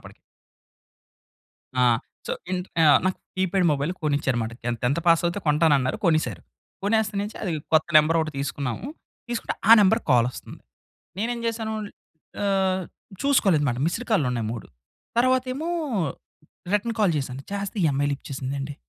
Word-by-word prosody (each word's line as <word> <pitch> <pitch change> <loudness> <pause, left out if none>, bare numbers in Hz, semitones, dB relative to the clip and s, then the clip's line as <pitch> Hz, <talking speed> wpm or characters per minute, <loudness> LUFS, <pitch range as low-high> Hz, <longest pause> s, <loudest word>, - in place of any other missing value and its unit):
అప్పటికి. - - -14 1.6
ఆ! - - +4 0.4
సో, - - -2 0.2
ఇంట్ 180 0 -2 0.2
ఆ! - - +6 0.2
నాకు 185 - 0 0.2
కీప్యాడ్ 185 -1 +1
మొబైల్ 145 +5 -1
కొనిచ్చారు 140 -4 +1
మాట. 110 - -3
నేను 120 -1 -1
10థ్ 140 +7 +1
పాస్ 165 0 +5
అవుతే 175 +4 -2
కొంటానన్నారు. 150 -4 +3
కొనేసారు. 155 -2 +1 0.4
కొనేస్తా 215 +1 +1
నుంచి 210 - -6
అది 180 -5 -1 0.2
కొత్త 155 0 +4
నెంబర్ 155 +2 +5
ఒకటి 155 -1 -3
తీసుకున్నాము. 140 - -3 0.4
తీసుకుంటే 240 -1 -3 0.2
ఆ - - +12
నంబర్‌కి 220 +4 +3
కాల్ 120 -1 +5
వస్తంది. - - -11 0.6
నేనేం 235 +2 -2
చేసాను? 220 -1 -2 0.7
ఆహ్, 190 -1 +1 0.4
చూసుకోలేదుమాట. 160 - +2
మిస్డ్ 210 +9 -2
కాల్‌లు 160 -12 +3
ఉన్నాయి 115 -3 -2
3 115 - -7 0.5
తర్వాతేమో 255 +5 +1 1.0
రిటర్న్ 215 +3 +1
కాల్ 200 -5 +3
చేసాను 135 0 -5
చేస్తే, 200 +2 -4
ఈ - - +5
అమ్మాయి 145 +1 0
లిఫ్ట్ 140 - -7
చేసిందండి. 135 +2 -4
170 Hz, 145 wpm, -24 LUFS, 140-210 Hz, 1.6 s, ఆ